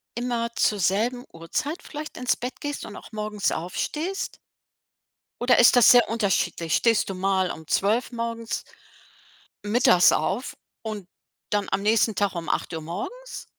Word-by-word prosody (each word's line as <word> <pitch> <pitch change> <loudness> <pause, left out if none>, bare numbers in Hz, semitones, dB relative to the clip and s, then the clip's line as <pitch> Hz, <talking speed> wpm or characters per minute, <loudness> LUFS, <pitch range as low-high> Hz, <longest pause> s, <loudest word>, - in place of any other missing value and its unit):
immer 240 -1 -1
zur 210 -2 +2
selben 230 +7 +1
Uhrzeit 165 - -4
vielleicht 305 0 -8
ins 250 0 +1
Bett 250 +1 -6
gehst 290 0 -4
und 205 - -9
auch - - -11
morgens 210 -1 -2
aufstehst? 305 - -3 1.0
Oder 245 +1 +4
ist 240 - +7
das 245 - +7
sehr 245 -1 +7
unterschiedlich? 190 -7 0
Stehst 230 -4 +2
du 190 - -4
mal 190 -1 +1
um 160 - -7
12 220 +6 +1
morgens 230 -1 -4 1.0
mittags 205 -5 +5
auf 235 +9 -1 0.3
und 215 -4 -6 0.4
dann 205 -1 0
am 195 +1 0
nächsten 220 0 +3
Tag 205 -2 +1
um 170 -1 -5
8:00 160 -1 -2
morgens? 215 - -7
215 Hz, 145 wpm, -25 LUFS, 190-245 Hz, 1.0 s, ist